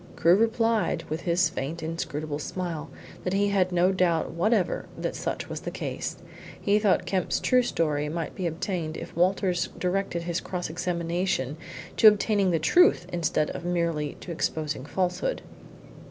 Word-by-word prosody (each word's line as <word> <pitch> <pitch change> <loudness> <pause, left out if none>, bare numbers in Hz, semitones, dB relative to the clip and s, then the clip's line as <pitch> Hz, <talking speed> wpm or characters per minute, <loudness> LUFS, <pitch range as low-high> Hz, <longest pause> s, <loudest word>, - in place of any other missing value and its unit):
Crewe 170 - +5
replied, 225 +1 +1
with 160 +2 -2
his 175 +1 +2
faint, 160 0 -4
inscrutable 155 -2 -3
smile, 165 -2 -4 0.3
that 180 - -1
he 200 +1 +2
had 190 -2 +2
no 180 +1 +3
doubt 175 -4 +1
whatever 185 +3 +1
that - - -3
such - - -3
was - - -5
the - - -5
case. - - -4 0.4
He 205 +1 +3
thought 205 -3 +2
Kemp's 185 -3 0
true 255 -1 +4
story 150 -10 0
might 165 +1 -3
be 185 - -2
obtained 165 -1 -3
if - - -8
Walters 180 +1 +1
directed 180 -2 -1
his 170 0 -2
cross 180 -3 -4
examination 170 -4 -1 0.4
to 220 - +8
obtaining 205 -2 +4
the 170 - +2
truth 260 - +4
instead 160 -3 +1
of - - -6
merely 170 -4 -1
to 180 - -7
exposing 155 -4 -2
falsehood. 190 - -1
175 Hz, 155 wpm, -27 LUFS, 160-195 Hz, 0.4 s, to